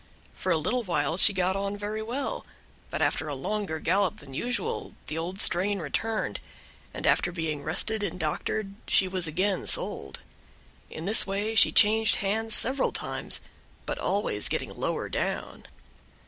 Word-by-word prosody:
For 185 - -2
a 165 - +3
little 240 +11 0
while 160 -7 0
she 195 - +8
got 185 -1 0
on 200 +1 -2
very 210 +1 -4
well, 245 +6 -3 0.5
but - - -1
after 160 - 0
a 145 - -3
longer 190 +3 -3
gallop 185 +2 +1
than 135 - -12
usual 245 - -3
the 155 - -3
old 175 +4 -4
strain 200 +1 +4
returned, 215 +7 -2 0.5
and - - -5
after 175 - +3
being 160 -4 -3
rested 195 +8 +2
and 185 -3 -3
doctored 195 +5 -2
she 190 - +3
was 185 -2 -2
again 185 +4 -1
sold. 70 -1 0 0.7
In 160 - -7
this 210 +2 +4
way 205 +3 -2
she 225 - +6
changed 220 +1 +5
hands 220 +2 0
several 265 +3 +1
times, - - -3 0.4
but - - -3
always 190 - +1
getting - - -3
lower - - -2
down. - - -4
195 Hz, 160 wpm, -27 LUFS, 165-215 Hz, 0.7 s, she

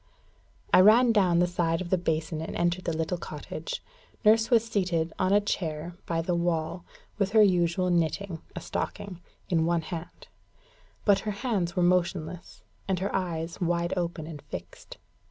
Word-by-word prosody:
I - - +8
ran 230 +5 +7
down 190 -6 +3
the 175 - +4
side 170 -2 0
of 180 -2 -6
the 185 - +4
basin, 160 -1 -1
and 160 - -5
entered 175 +1 0
the 165 -2 -1
little 165 +2 -2
cottage. - - -6 0.4
Nurse 220 +1 +5
was 230 -3 +4
seated 180 -7 -1
on 185 0 +2
a 205 - +6
chair 170 -4 -3
by 165 -1 0
the 175 - -1
wall, 170 0 -1 0.4
with 200 0 0
her 220 -1 +7
usual 180 -1 +2
knitting, 170 +1 -1
a - - -5
stocking, 180 -3 -5 0.3
in 165 -2 +2
one 170 -1 +2
hand; 170 0 -8 0.8
but 200 -2 +5
her 215 - -4 0.2
hands 195 -7 0
were 180 - +2
motionless, 175 -1 -1 0.2
and 190 -1 +1
her 195 +3 -2
eyes 170 -2 -3
wide 170 0 0
open 170 -3 -3
and 155 -3 -8
fixed. - - -9
175 Hz, 170 wpm, -28 LUFS, 165-190 Hz, 0.8 s, I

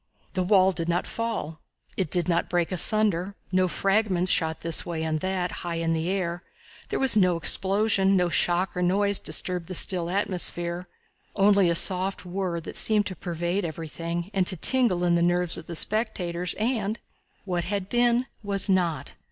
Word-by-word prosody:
The 185 - -1
wall 190 0 +4
did 170 -2 -3
not 175 +1 0
fall; 225 -9 -5 0.3
it 185 -5 -2
did 175 0 +3
not 170 -1 0
break 175 0 -1
asunder; 195 0 +2 0.2
no 185 0 +2
fragments 195 -1 +1
shot 160 -1 +1
this 165 -1 +1
way 165 -2 -4
and 155 -1 -2
that 185 0 -2
and - - -8
high 170 -1 -5
in 165 0 -1
the 160 +2 -2
air; 180 -2 -2 0.5
there - - -2
was 265 -4 +6
no 185 -4 +3
explosion; 195 +2 +3
no 180 -2 +2
shock 175 +3 +1
or 180 - -2
noise 200 +3 +1
disturbed 180 -2 -3
the 185 - -6
still 175 -1 +1
atmosphere 180 -2 -2 0.5
only 200 -2 +4
a 170 - +1
soft 185 +3 +2
whirr, 180 -1 -3
that - - -9
seemed 210 -2 +1
to 185 - -5
pervade 175 +3 -3
everything 170 +2 -5
and 185 -2 0
to 185 - 0
tingle 230 -4 +3
in 175 -1 +2
the 170 - +2
nerves 175 0 +1
of 165 - -7
the 170 - -6
spectators; 180 -4 -1
and 220 -1 -2 0.5
what 175 -3 -2
had 200 0 -3
been 240 +2 +1 0.2
was 200 -1 -1
not! 180 -5 -1
180 Hz, 180 wpm, -25 LUFS, 170-200 Hz, 0.5 s, was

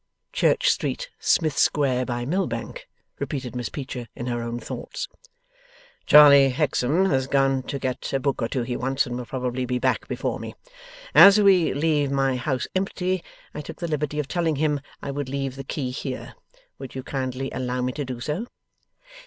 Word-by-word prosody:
'Church - - +2
Street, - - -3
Smith 155 -5 +2
Square, 130 -3 +2
by 120 -1 -2
Mill 185 +8 0
Bank,' - - -6 0.3
repeated 130 -4 -4
Miss 120 -3 -3
Peecher, 130 -4 -6
in 120 - -5
her 120 -1 -2
own 120 0 -4
thoughts. - - -6 1.0
'Charley 140 -2 +8
Hexam 150 +4 +1
has 130 0 +1
gone 135 -1 +2
to 140 +2 -5
get 130 -2 -3
a 135 - +1
book 135 -1 -1
or 115 - +1
two 125 0 -2
he 120 +1 -3
wants, 135 +3 0
and 120 - -5
will 125 -1 -5
probably 125 -1 -2
be 125 0 -1
back - - 0
before - - -3
me. - - -7 0.6
As 200 +1 +9
we 190 -5 +5
leave 145 -1 +1
my 135 -1 +1
house 130 0 -2
empty, 185 -1 -1 0.3
I 150 - -5
took - - -9
the 170 - -4
liberty 150 -1 -2
of 150 -2 -1
telling 165 -2 0
him 150 -1 0 0.2
I 140 - -3
would 140 -1 -4
leave 135 -1 -3
the 135 - -7
key 130 -1 -3
here. 130 0 -5 0.5
Would 135 -1 -9
you 130 - -5
kindly 130 0 -3
allow 125 -1 -2
me 125 - 0
to 145 - -3
do 130 -2 -6
so? 155 - -3
135 Hz, 185 wpm, -24 LUFS, 125-150 Hz, 1.0 s, As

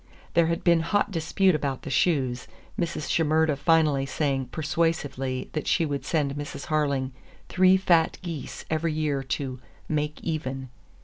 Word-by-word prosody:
There 170 -1 +4
had 170 0 -1
been 170 -1 +5
hot 205 +5 +1
dispute 185 +2 +2
about 140 -3 -2
the 140 - -5
shoes, 130 -4 +1 0.3
Mrs. 170 -3 -2
Shimerda 160 -1 +2
finally 150 -2 +3
saying 135 -3 -1
persuasively 145 -4 -1
that 155 - -3
she 165 - +3
would 145 -2 -3
send 145 -5 0
Mrs. 145 +4 -6
Harling 140 -4 0 0.4
three 185 0 +5
fat 170 -4 +3
geese 165 -5 -6
every 160 0 0
year 150 -3 0
to 130 -1 -3 0.3
"make 150 0 -1
even." 135 -5 -3
155 Hz, 145 wpm, -26 LUFS, 135-165 Hz, 0.4 s, been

